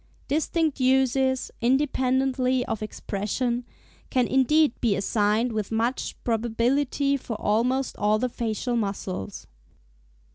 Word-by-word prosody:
Distinct 310 +1 0
uses, 260 0 +2
independently 260 0 +1
of 220 - -3
expression, 225 +4 -2 0.4
can 255 -2 +2
indeed 280 +1 +3
be 225 -5 +2
assigned 210 +4 +1
with 215 -2 -3
much 230 +3 -1
probability 245 +5 +1
for 230 -4 -6
almost 250 +5 +1
all 210 +1 +2
the 255 +3 0
facial 235 +1 -2
muscles. 200 -2 -4
250 Hz, 105 wpm, -25 LUFS, 220-265 Hz, 0.4 s, indeed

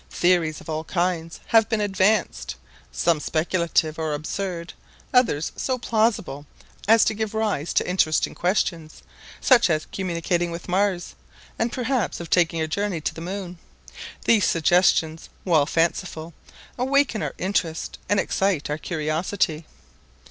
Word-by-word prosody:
Theories 175 -4 +1
of - - -14
all 155 0 -3
kinds 170 -1 -2
have 225 -2 +4
been 225 -2 0
advanced; 195 - +1 0.4
some 165 - +1
speculative 165 0 0
or 155 -2 -1
absurd, 170 +2 -4 0.4
others 225 - +2
so 260 -1 -1
plausible 215 - 0 0.4
as 225 +1 +6
to - - +1
give 220 0 -3
rise 210 -8 -1
to - - +1
interesting 170 -4 +1
questions, 170 -4 -1 0.4
such 245 -6 +5
as 155 -2 0
communicating 175 -1 -1
with 170 0 -7
Mars, 185 -1 0 0.5
and 230 +1 0
perhaps 250 -3 -1
of 170 -1 -8
taking 170 -2 +3
a 160 - 0
journey 200 +2 -2
to - - -2
the 165 - -9
Moon. 180 0 -6 0.7
These 220 -4 +4
suggestions, 165 -1 +2
while 155 -6 +3
fanciful, 165 0 -1 0.5
awaken 265 -3 +2
our - - -3
interest 175 -4 -2
and 205 - +3
excite 190 -9 0
our 150 - -2
curiosity. 160 0 -2
175 Hz, 135 wpm, -24 LUFS, 160-205 Hz, 0.7 s, as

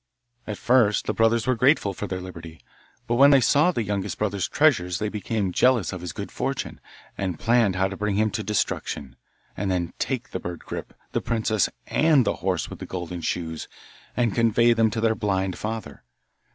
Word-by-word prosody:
At 105 -2 -4
first 120 -4 +3
the - - -1
brothers 115 0 +2
were 130 - +3
grateful 125 -4 +3
for 105 - -5
their 95 -1 -4
liberty, 85 -3 -9 0.5
but 120 - 0
when 140 +2 +8
they 140 -1 +7
saw 145 +7 +4
the 120 -10 -1
youngest 100 -1 -3
brother's 100 -3 -1
treasures 90 - +2
they 105 - -2
became 105 -2 -2
jealous 120 -1 +3
of 90 - -6
his 90 -2 -5
good - - -7
fortune, - - -3 0.4
and 95 -4 -2
planned 115 -3 +2
how 95 +1 +2
to 95 - -6
bring 105 0 -1
him 110 +1 +2
to 110 - -2
destruction, 70 - -2 0.4
and 100 0 -2
then 90 -2 -1
take 130 -4 -2
the 95 - -3
bird 85 -1 -7
Grip, - - -7 0.2
the - - -1
princess, 110 -3 +1 0.2
and 155 -5 +3
the - - 0
horse 90 -1 -1
with - - -9
the - - -7
golden 90 -1 -5
shoes, 80 -2 -3 0.5
and 120 -4 +2
convey 115 +1 +4
them 115 -1 +3
to 110 +1 -3
their 115 0 +3
blind 95 -4 -1
father. 110 -9 -6
105 Hz, 195 wpm, -25 LUFS, 95-115 Hz, 0.5 s, when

